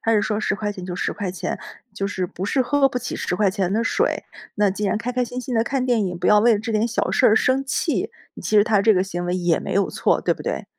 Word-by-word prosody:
他 225 - +1
是 210 -2 +3
说： 215 -1 -1
“10 195 - 0
块 205 0 -3
钱 185 -2 -8
就 180 -1 -5
10 - - -1
块 200 -4 -4
钱， 185 - -4 0.4
就 195 - -2
是， 190 -2 -2
不 185 +2 -6
是 260 - +2
喝 285 +1 +3
不 250 - -3
起 245 - -5
10 180 - -2
块 205 -2 +3
钱 190 -2 -1
的 225 +3 0
水， - - 0 0.3
那 205 -2 +2
既 205 +1 -2
然 195 - +1
开 245 +3 -3
开 250 0 0
心 245 +1 -4
心 255 -1 -4
地 225 - +3
看 260 +1 -1
电 230 -6 +1
影， 180 -1 -4
不 - - -2
要 210 - +6
为 230 +1 +5
了 - - -1
这 225 +1 -4
点 215 +2 +1
小 240 - -1
事 255 - +4
儿 - - +6
而 - - +4
生 260 +3 +2
气。” 270 - -1 0.3
其 215 - +1
实 205 - +6
他 215 -3 +3
这 215 0 +4
个 185 - +2
行 175 -2 -4
为 180 +1 0
也 175 -2 +1
没 - - -5
有 200 - +1
错， - - +1
对 - - +2
不 - - -8
对？ - - -3
210 Hz, 310 characters per minute, -22 LUFS, 190-240 Hz, 0.4 s, 要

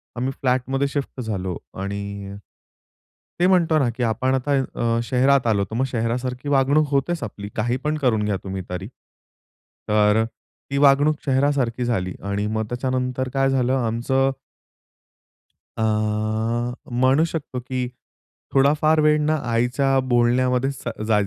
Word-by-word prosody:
आम्ही 130 +3 -1
फ्लॅटमध्ये 135 +2 +1
शिफ्ट 140 -2 -4
झालो 95 -6 -3 0.2
आणि 100 0 -5 1.1
ते 180 - +4
म्हणतो 170 -4 +3
ना 125 -3 +2
की 125 - -1
आपण 130 +3 +1
आता 130 +3 -2 0.2
अ, 115 0 +1
शहरात 130 +1 +3
आलो. 100 -3 +2
तर 110 - -8
मग 130 +3 +1
शहरासारखी 125 +3 -2
वागणूक 140 +2 +3
होतेच 140 +2 0
आपली, 100 -1 -6
काही 120 +4 0
पण 150 +1 0
करून 120 -7 +1
घ्या 105 -2 0
तुम्ही 95 -1 -4
तरी. 90 - -5 1.0
तर 105 +1 +4 0.5
ती 140 - 0
वागणूक 145 +2 +5
चेहरासारखी 130 -3 +1
झाली 90 -7 -1 0.2
आणि 100 +1 -1
मग 110 0 -1
त्याच्यानंतर 130 0 -2
काय 135 0 +2
झालं 130 -1 +1
आमचं 130 +3 +1 1.5
अ, - - -2 1.2
म्हणू 130 +5 +4
शकतो 150 -6 -4
की 125 0 -3 0.7
थोडा 140 +2 +5
फार 155 0 +4
वेळ 150 0 +4
ना 155 +1 +2 0.2
आईच्या 125 +3 +2
बोलण्यामध्ये 125 +2 +2 0.4
ज - - 0
125 Hz, 135 wpm, -22 LUFS, 115-140 Hz, 1.5 s, वागणूक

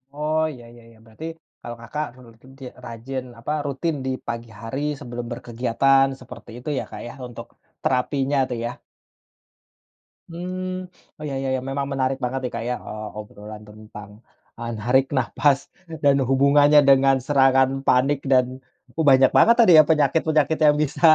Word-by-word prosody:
Oh, 155 +1 0
iya 120 -3 -13
iya 120 -1 -16
iya, 115 - -20
berarti 115 +8 -10 0.4
kalau 120 - -7
Kakak 150 +7 -4 0.2
rutin 115 +3 -18
ti - - -11 0.2
rajin, 125 +3 -6 0.2
apa, 120 - -5
rutin 145 +4 -2
di 130 - -1 0.2
pagi 115 0 -5
hari 115 +5 -5 0.2
sebelum 120 -3 -6
berkegiatan 125 +3 +2
seperti 125 -1 -12
itu 125 - -7
ya, - - -1
Kak, - - -8
ya, - - -8
untuk 120 - -9 0.4
terapinya 135 +2 0
tuh, 125 - -3
ya? 120 +1 -6 1.5
Hmm, 185 +2 -5 0.3
oh 155 - -10
iya 140 -2 -4
iya. 130 -1 -1
Memang 140 0 -2
menarik 135 0 0
banget 125 +2 -1
nih, 125 - -4
Kak 115 - -4
ya, 125 - 0
eee, 110 0 -6
obrolan 105 0 -10
tentang, 105 -1 -12 0.5
ah, 115 0 -5
narik 125 +5 +2
nafas 135 +2 +2 0.4
dan 140 -1 +5
hubungannya 145 +2 +5
dengan 135 0 +5
serangan 135 -2 +4 0.2
panik 135 +3 +3
dan 130 -1 +5 0.5
oh 160 - +1
banyak 130 0 +6
banget 235 - +6
tadi 225 -6 +6
ya, 155 - +9
penyakit-penyakit 155 0 +2
yang 150 -1 +5
bisa 150 0 -5
135 Hz, 160 wpm, -22 LUFS, 120-145 Hz, 1.5 s, ya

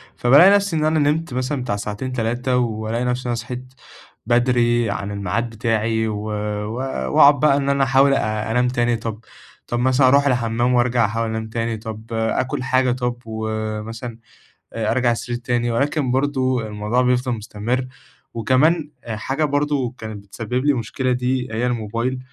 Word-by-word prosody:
فبالاقي 145 +10 +6
نفسي 200 -3 +2
إن 155 -1 +1
أنا 155 0 +2
نِمت 150 +1 0
مثلًا 130 +2 -2
بتاع 115 -5 -2
ساعتين، 105 +5 -4
3 125 +2 0
والاقي 115 0 -1
نفسي 125 0 -1
إن - - -5
أنا 120 - 0
صحيت 125 +2 -7 0.5
بدري 120 -1 +2
عن 100 0 -3
الميعاد 100 +4 -2
بتاعي، 110 0 0
و 105 -1 -3
و 105 +1 -3 0.4
واقعد 140 -1 +7
بقى 145 -2 +4
إن 140 -1 -1
أنا 140 -1 +3
احاول 135 +1 +4
أ 110 -3 -1
أنام 125 +2 +2
تاني، 120 -1 +1
طب 110 -1 -5 0.5
طب 120 - -2
مثلًا 130 +1 +4
أروح 140 +2 +4
الحمّام 120 -1 +1
وارجع 120 -1 +3
أحاول 115 +2 -1
أنام 110 0 -4
تاني، 115 0 -2
طب 110 0 -8
آكل 115 +3 -1
حاجة 130 0 +2
طب 125 -1 -2
ومثلًا 110 +1 -4 0.5
آآ، 110 -2 -1
أرجع 125 0 +2
السرير 120 +1 -3
تاني، 120 -1 -1
ولكن 140 +3 0
برضه 130 -3 0
الموضوع 105 +4 0
بيفضل 125 0 +1
مستمرّ. 115 +3 -3 0.5
وكمان 145 +7 +2
آآ، 110 -2 -4
حاجة 135 +7 -1
برضه 145 -4 0
كانت 110 -2 -7
بتسبب 120 +5 -3
لي 145 - +4
مشكلة 130 +1 -2
دي، 125 0 -1
هي 115 +3 0
الموبايل 120 +2 -2
120 Hz, 165 wpm, -21 LUFS, 110-130 Hz, 0.5 s, واقعد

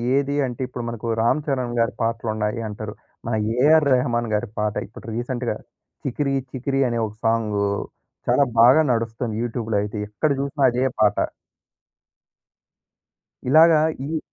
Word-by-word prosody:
ఏది 140 0 +1
అంటే, 125 0 -6
ఇప్పుడు 125 -1 -6
మనకు 115 -1 -6 0.2
'రామ్ 130 +6 +2
చరణ్' 125 -4 -1
గారి 115 - +1
పాటలున్నాయి 110 -1 -1
అంటారు. 105 0 -6 0.3
మన 120 - -1 0.2
'ఏఆర్ 150 +4 +5
రెహమాన్' 120 -3 0
గారి 105 - -2
పాట 105 -1 0
ఇప్పుడు 105 - -13
రీసెంట్‌గా. 120 0 -2 0.5
'చికిరి 140 +1 -1 0.2
చికిరి' 135 +1 0
అనే 120 - -1
ఒక 105 - -10
సాంగు. 110 -3 +1 0.6
చాలా 140 - +5 0.2
బాగా 130 +7 +7
నడుస్తుంది 115 0 -2
యూట్యూబ్‌లో 115 -2 -2
అయితే. 105 +1 -5
ఎక్కడ 145 +8 0
చూసినా 140 +1 -2
అదే 125 +2 0 0.2
పాట. 105 -2 +4 2.3
ఇలాగా 160 +2 +7 0.3
ఈ 160 +1 -1
120 Hz, 135 wpm, -23 LUFS, 110-135 Hz, 2.3 s, బాగా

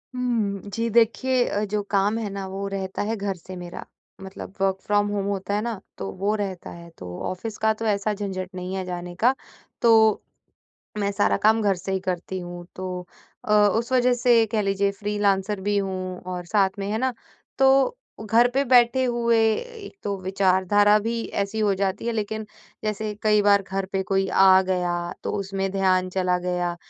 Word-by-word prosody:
हुँ, 225 -6 -1
जी। 230 +1 -1
देखिए, 240 +3 +3
अ, 205 +1 -1
जो 210 +1 -1
काम 205 +2 +2
है 220 -3 -3
न 195 -1 -4
वो 200 +1 -4
रहता 190 -1 -4
है 225 +2 -1
घर 200 -2 -3
से 185 +2 -10
मेरा, 175 -1 -8 0.4
मतलब 190 0 -9
वर्क 195 -1 +2
फ्रॉम 205 0 +2
होम 205 -1 -2
होता 200 0 -2
है 210 - 0
ना? 230 -4 -3 0.2
तो 95 - -4
वो 205 +2 +2
रहता 195 -4 -4
है 170 0 -11
तो 90 -1 -8
ऑफ़िस 205 +4 -5
का 220 0 +2
तो 225 +1 -6
ऐसा 210 0 +1
झंझट 190 -2 -4
नहीं 180 +1 -5
है 190 -1 -3
जाने 175 -1 -6
का। 255 - +6 0.5
तो, 220 -2 +5 0.8
मैं 200 0 0
सारा 100 - +2
काम 220 +1 +3
घर 200 -2 +2
से 185 +2 -6
ही 190 - 0
करती 185 0 -4
हूँ, 175 0 -8
तो 180 -1 -5 0.4
अ, - - 0
उस 210 +4 +3
वज़ह 250 -1 +4
से 235 -2 +5
कह 215 -2 +1
लीजिए 200 0 +1
फ्रीलांसर 205 -1 0
भी 205 0 +2
हूँ 185 -2 -3
और 180 -1 -4
साथ 195 0 +2
में 195 - -3
है 220 - 0
ना? 260 +1 0 0.4
तो 270 - +4 0.3
घर 230 +3 +4
पे 275 +1 +2
बैठे 245 +1 +5
हुए 235 -2 +2 0.2
एक 470 -5 -8
तो 200 -1 -1
विचारधारा 195 +2 +3
भी 230 +2 -2 0.2
ऐसी 210 +2 -5
हो 205 -2 +2
जाती 195 +3 -2
है। 235 - 0
लेकिन 220 0 -3 0.4
जैसे 215 0 -2
कई 210 -1 +4
बार 200 -1 +5
घर 195 0 -1
पे 195 -1 0
कोई 195 0 0
आ 190 -1 +6
गया 180 -2 -1 0.3
तो - - -2
उसमें 195 0 -2
ध्यान 185 -1 +2
चला 180 -1 +1
गया 180 -1 -2
200 Hz, 190 wpm, -24 LUFS, 190-220 Hz, 0.8 s, का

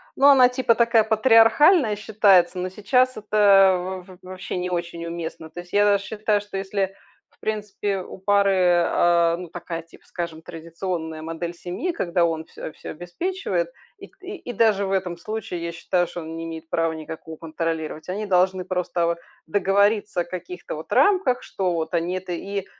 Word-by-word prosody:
ну 275 - +5
она 265 -3 +8
типа 250 -2 +2
такая 230 -1 +4
патриархальная 225 - +5
считается, 200 -4 +3
но 185 - -2
сейчас 255 +6 +1
это 195 -3 +3
в 185 - -13
в - - -40
вообще 185 0 -7
не 180 0 -2
очень 170 -1 -4
уместно. 165 -1 -6
То 170 +3 -9
есть 175 0 -11
я 205 0 +4
даже 200 -1 +3
считаю, 210 -1 0
что 205 -1 -7
если, 195 0 -2 0.3
в - - -33
принципе, 205 -2 -2
у 185 - -9
пары, 190 -3 +3
а, 170 -1 +3
ну 180 -1 -8
такая, 170 -1 -6
типа, 165 - -20
скажем, 170 -2 -6
традиционная 165 -1 -5
модель 165 +2 -5
семьи, 180 - -4
когда 175 - 0
он 160 -1 -1
всё - - -8
всё - - -9
обеспечивает. 365 - -3 0.3
И - - -11
к - - -31
и 370 -10 -7
даже 210 -3 +3
в 190 - -3
этом 180 -3 -1
случае, 180 -3 -5
я 170 - -4
считаю, 175 +1 0
что 175 +1 -7
он 160 0 -7
не 165 - -5
имеет 165 0 -8
права 165 0 0
никакого 160 0 -8
контролировать. 160 -1 -4
Они 200 +4 -3
должны 185 -1 +2
просто 180 -2 -1
вот 170 0 0 0.3
договориться 200 +2 +2
о - - -1
каких-то 360 - -7
вот - - -6
рамках, 370 -11 +3
что 185 -2 -2
вот 160 0 -3
они 170 +1 0
это, 185 -1 -5
и 195 +2 -4
185 Hz, 180 wpm, -23 LUFS, 170-210 Hz, 0.3 s, она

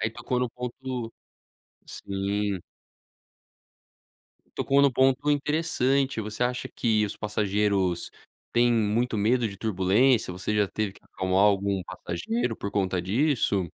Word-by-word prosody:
aí 110 - 0
tocou 125 +2 -3
no 125 -1 -1
ponto 125 -1 -5 0.7
Sim. 100 0 -2 2.0
Tocou 140 +1 +3
num 140 - +5
ponto 135 +3 +2
interessante. 140 -3 +1
Você 110 +2 -4
acha 125 0 -1
que 110 -2 +1
os 100 - -7
passageiros 100 -4 0 0.4
têm 120 0 +4
muito 115 +1 +1
medo 115 +3 +2
de 100 - -9
turbulência? 110 +4 +2
Você 90 +4 -3
já 105 -2 +2
teve 110 -2 -2
que - - -20
acalmar 95 0 -1
algum 100 -1 +2
passageiro 115 +10 -3
por 100 - -5
conta 95 -3 0
disso? 105 - +1
110 Hz, 125 wpm, -26 LUFS, 100-125 Hz, 2.0 s, num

